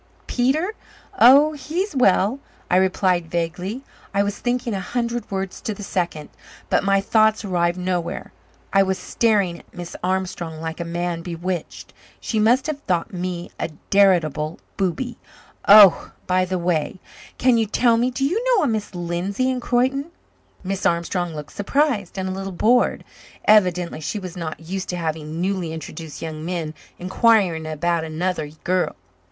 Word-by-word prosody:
"Peter? 295 - +1 0.5
Oh, 280 +6 +7
he's 320 +5 -3
well," 220 0 +3 0.3
I 180 - +5
replied 185 -2 +2
vaguely. 180 +9 -3 0.3
I 200 - +4
was 205 0 -3
thinking 245 -1 -1
a 195 - -2
hundred 235 +3 -3
words 195 -1 -4
to 220 -4 -3
the 205 - -8
second, 170 -6 -3 0.4
but - - +3
my 195 0 +3
thoughts 220 +2 +2
arrived 175 -2 0
nowhere. 180 -2 -3 0.4
I 195 - +6
was 190 -1 +1
staring 200 -7 +1
at - - -21
Miss 175 -1 -7
Armstrong 180 -3 -2
like 160 +1 -5
a - - -1
man 170 0 -2
bewitched. 175 0 -5 0.3
She 220 - -2
must 240 +5 +4
have 305 -2 -3
thought 175 -1 0
me 180 -1 -4
a - - -2 0.2
veritable 165 -6 +3 0.2
booby. 220 +6 -2 0.5
"Oh, 205 -3 +8
by 185 0 +2
the 185 0 -2
way 175 0 -1 0.4
can 250 -2 +4
you 220 - +1
tell 235 +2 +3
me 240 +2 +2
do 265 +2 -1
you 385 - 0
know 390 - +3
a - - +2
Miss 215 -4 -2
Lindsay 180 +8 -1
in 255 - -2
Croyden?" 255 +3 +1 0.6
Miss 195 0 -3
Armstrong 170 0 0
looked 150 -1 -8
surprised 215 - 0
and 190 0 -2
a - - -2
little 195 +1 -4
bored. 230 +7 +2 0.4
Evidently 180 -6 +3
she 155 +7 -3
was 185 -3 -7
not 165 -2 -5
used 190 +1 -4
to 180 - -2
having 160 -1 -4
newly 185 -2 -1
introduced 160 -1 -7
young 155 -1 -5
men 165 -3 -3 0.2
inquiring 185 -4 +2
about 165 +2 0
another 160 0 -2 0.2
girl. 185 0 0
185 Hz, 160 wpm, -22 LUFS, 170-225 Hz, 0.6 s, Oh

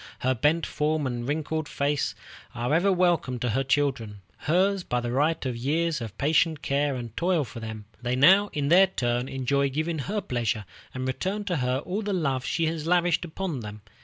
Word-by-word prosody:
Her 130 +1 +2
bent 150 +7 +2
form 150 0 -1
and 120 -1 -3
wrinkled 155 +1 -2
face 145 +1 -1 0.4
are 120 +4 -1
ever 180 +5 +3
welcome 175 -8 +2
to 120 0 -2
her 135 +5 +1
children, 130 -7 0
hers 190 +4 +1
by 125 - -1
the 120 0 -3
right 150 +4 +1
of 125 -2 -2
years 155 +5 0
of 110 -3 -7
patient 155 +1 +2
care 140 0 +1
and 120 -3 -7
toil 175 -3 +1
for 115 -2 -8
them. 110 -2 -7 0.2
They 125 0 -1
now, 190 +10 +6
in 145 -2 -1
their 190 +3 +7
turn, 125 -7 -1
enjoy 140 +1 0
giving 155 +3 -2
her 200 +10 -2
pleasure, 120 - -2 0.3
and 130 0 -4
return 190 +10 -2
to 180 -4 -1
her 125 -1 0
all 195 +4 -2
the 205 -1 -2
love 135 -8 0
she 165 +3 0
has 160 -1 -2
lavished 175 0 +2
upon 170 -3 -4
them. 105 -2 -8
145 Hz, 195 wpm, -26 LUFS, 125-170 Hz, 0.4 s, their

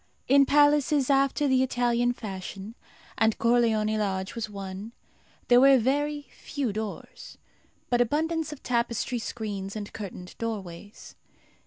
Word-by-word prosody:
In 275 0 +5
palaces 290 -1 +3
after 275 +1 +2
the 260 -1 +3
Italian 245 -1 +1
fashion, 195 -2 -7 0.5
and 220 -1 +3
Corleone 225 -2 +2
Lodge 190 -2 -2
was 230 -2 -4
one, 200 +2 -7 0.5
there 245 0 +6
were 275 0 +7
very 290 +4 0
few 270 -7 -4
doors, 215 0 -7 0.5
but 245 0 +3
abundance 315 +5 0
of 300 - -10
tapestry 235 0 -1
screens 205 -4 -5
and 205 -1 -6
curtained 185 -3 -8
doorways. 205 -3 -6
235 Hz, 125 wpm, -27 LUFS, 210-275 Hz, 0.5 s, were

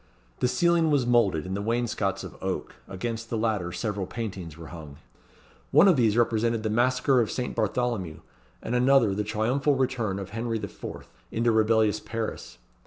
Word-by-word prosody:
The - - +2
ceiling 170 +3 +3
was 140 -4 +2
moulded, 115 -10 +2
and 95 +1 -3
the 100 - -2
wainscots 110 -3 -1
of - - -9
oak; - - -3
against 115 +4 -5
the 115 - -1
latter 105 -6 -1
several 100 0 -3
paintings 95 -9 -6
were 80 -2 -10
hung. 75 -4 -9 0.7
One 200 - +6
of 185 - +6
these 115 -4 +2
represented 115 -1 +1
the 110 - -1
Massacre 125 +3 +3
of 110 - -1
St. 125 - -3
Bartholomew, 105 -11 -1 0.4
and 115 - -3
another 125 -4 +4
the 105 +2 -1
triumphal 125 +7 0
entry 115 -7 -1
of 100 0 -7
Henri 115 +1 -2
IV. 100 -3 -8 0.2
into 115 +1 +1
rebellious 110 -1 +3
Paris. 115 -1 -5
115 Hz, 170 wpm, -26 LUFS, 100-120 Hz, 0.7 s, One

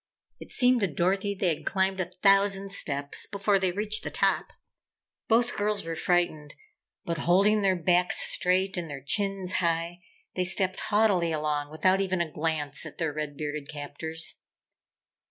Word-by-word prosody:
It - - -11
seemed 250 -2 +3
to 200 - +2
Dorothy 190 +6 0
they 190 -2 0
had 150 - -10
climbed 190 0 0
a 185 - 0
thousand 195 +1 +2
steps 145 -6 -1
before 200 0 +1
they 190 -1 +1
reached 210 +3 -3
the - - -4
top. - - +1 0.8
Both 235 +2 +2
girls 205 -2 -1
were 165 0 -4
frightened, 160 -4 0 0.5
but 170 -2 -3
holding 195 +7 +3
their 190 -2 +2
backs 180 +1 +2
straight 185 +1 +2
and 170 -2 -4
their 140 -2 -7
chins 195 +1 0
high, 170 0 -1 0.3
they 185 - -1
stepped 185 0 +2
haughtily 200 -6 +2
along 150 -2 -2
without 185 +5 +2
even 185 -2 -1
a 170 -2 -2
glance 150 -2 -2
at - - -9
their 160 -3 -2
red 150 -1 -5
bearded 150 -1 -5
captors. 160 +2 -6
180 Hz, 160 wpm, -27 LUFS, 160-195 Hz, 0.8 s, seemed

